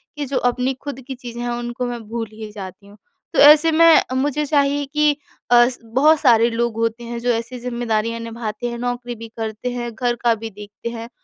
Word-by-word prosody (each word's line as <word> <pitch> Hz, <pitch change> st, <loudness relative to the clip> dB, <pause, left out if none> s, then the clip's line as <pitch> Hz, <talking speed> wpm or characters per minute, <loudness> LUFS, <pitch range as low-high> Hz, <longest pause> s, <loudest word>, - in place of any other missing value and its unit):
कि 295 Hz, -1 st, -3 dB
जो 270 Hz, 0 st, -2 dB
अपनी 250 Hz, +2 st, 0 dB
खुद 270 Hz, +1 st, -7 dB
की 265 Hz, -, -5 dB
चीज़ें 240 Hz, -1 st, -8 dB
हैं 240 Hz, -, -2 dB
उनको 240 Hz, +1 st, -3 dB
मैं 240 Hz, -1 st, -4 dB
भूल 230 Hz, 0 st, -3 dB
ही 215 Hz, -1 st, -8 dB
जाती 200 Hz, -1 st, -9 dB
हूँ। 205 Hz, +1 st, -16 dB, 0.4 s
तो -, -, +1 dB
ऐसे 300 Hz, +3 st, +8 dB
में 330 Hz, 0 st, +6 dB
मुझे 290 Hz, +3 st, 0 dB
चाहिए 285 Hz, -1 st, +1 dB
कि 300 Hz, +2 st, +2 dB, 0.4 s
अ, 240 Hz, 0 st, +7 dB, 0.2 s
बहुत 275 Hz, +7 st, +3 dB
सारे 235 Hz, -4 st, +5 dB
लोग 235 Hz, -1 st, -1 dB
होते 230 Hz, +1 st, -1 dB
हैं 235 Hz, 0 st, -5 dB
जो 245 Hz, +1 st, -2 dB
ऐसी 240 Hz, +2 st, -3 dB
ज़िम्मेदारियाँ 230 Hz, -2 st, -2 dB
निभाते 230 Hz, 0 st, -5 dB
हैं, 235 Hz, -, -5 dB
नौकरी 245 Hz, 0 st, -3 dB
भी 230 Hz, 0 st, -9 dB
करते 220 Hz, +2 st, -4 dB
हैं, 240 Hz, -1 st, -4 dB
घर 245 Hz, 0 st, 0 dB
का 235 Hz, -1 st, +4 dB
भी 225 Hz, +1 st, -7 dB
देखते 210 Hz, +2 st, -8 dB
हैं, 230 Hz, 0 st, -7 dB
240 Hz, 210 wpm, -20 LUFS, 230-260 Hz, 0.4 s, ऐसे